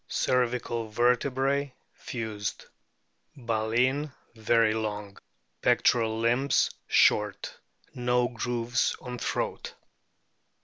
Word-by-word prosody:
Cervical 120 -2 0
vertebrae 130 +4 +1 0.2
fused. 110 -4 -5 0.7
Baleen 120 +5 0 0.2
very 115 0 +2
long. 105 -2 -4 0.5
Pectoral 110 -2 +2
limbs 120 +4 +2 0.2
short. 105 -2 +2 0.4
No 125 0 +1
grooves 120 0 -1
on 125 -1 -7
throat. - - -3
120 Hz, 75 wpm, -28 LUFS, 110-125 Hz, 0.7 s, very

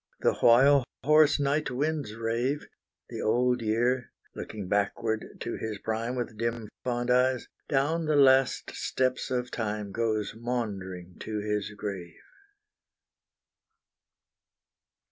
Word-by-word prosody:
The - - +3
while 135 +4 +6 0.2
hoarse 150 0 +5
night 145 +2 +1
winds 140 -3 -2
rave, 115 +5 -1 0.4
The - - -5
old 125 +2 +2
year 120 +3 0 0.2
looking 105 -4 -6
backward 110 +3 0 0.2
to - - -3
his 110 -2 -4
prime 115 +4 -2
With 120 -3 -4
dim 115 -2 -2
fond 120 0 -1
eyes, 125 0 +2 0.2
down 155 +4 +1
the 155 -1 +1
last 135 -2 +4
steps 130 0 -1
of 125 -1 -2
time 105 -3 -3
Goes 110 -1 -1
maundering 100 -7 -4
to 110 -1 -4
his 105 -1 -2
grave! 95 -5 -5
120 Hz, 115 wpm, -28 LUFS, 110-130 Hz, 0.4 s, while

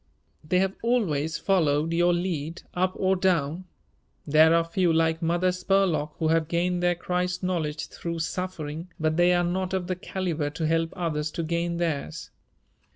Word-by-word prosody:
They 160 +4 +1
have 190 +1 +2
always 165 -11 0
followed 160 -4 +1
your 175 +1 +3
lead 170 -2 -2
up 185 +1 +1
or 190 0 +2
down. 180 -2 0 0.6
There 155 +2 +5
are 170 - +4
a - - -2
few 170 +1 +1
like 160 0 +2
Mother 175 +2 +2
Spurlock 180 -4 +1
who 160 -1 0
have 165 -1 +2
gained 175 +2 0
their 175 0 +2
Christ 180 +1 -2
knowledge 160 -4 -1
through 170 -1 -5
suffering, 165 -1 -4
but 155 0 +1
they 175 +1 +4
are 175 0 +2
not 185 +2 -1
of 185 -2 -2
the 185 +1 -2
calibre 175 -5 -3
to 160 +2 -3
help 165 +1 +1
others 160 -4 -2
to 170 - -2
gain 170 +1 -1
theirs. 160 -1 -3
170 Hz, 170 wpm, -26 LUFS, 160-180 Hz, 0.6 s, There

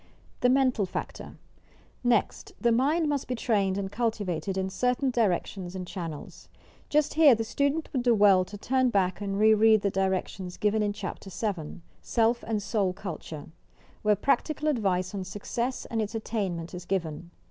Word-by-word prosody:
THE 250 - +3
MENTAL 255 -6 +2
FACTOR - - -6 0.7
Next, 245 - 0
the 235 - +2
mind 295 +7 +2
must 285 -2 -1
be 250 - -2
trained 200 -5 +1
and 195 -1 -3
cultivated 200 -6 -2
in 190 0 -1
certain 250 +4 +1
directions 190 -4 -1
and 185 -1 -4
channels. 165 -5 -7 0.4
Just 300 0 +2
here 300 -5 +7
the 225 - -2
student 280 +8 0
would 260 - +1
do 240 -1 +3
well 200 -3 +6
to 205 - -9
turn 260 +4 +1
back 190 -3 0
and 195 -1 -2
re 220 +1 +6
read 220 0 +5
the 200 - +1
directions 190 -1 -2
given 210 +1 +1
in 205 -1 +1
Chapter 195 -1 -6
VII, 185 -5 -4 0.2
"Self 235 +1 +1
and 215 -2 -1
Soul 195 -4 0
Culture," 165 -6 -7 0.5
where 210 -1 +3
practical 300 - 0
advice 190 -9 0
on 195 -2 -3
success 235 +7 -3
and 225 -1 -2
its 215 +1 -4
attainment 190 -7 -3
is 180 0 -7
given. 170 -3 -3
210 Hz, 170 wpm, -28 LUFS, 190-245 Hz, 0.7 s, here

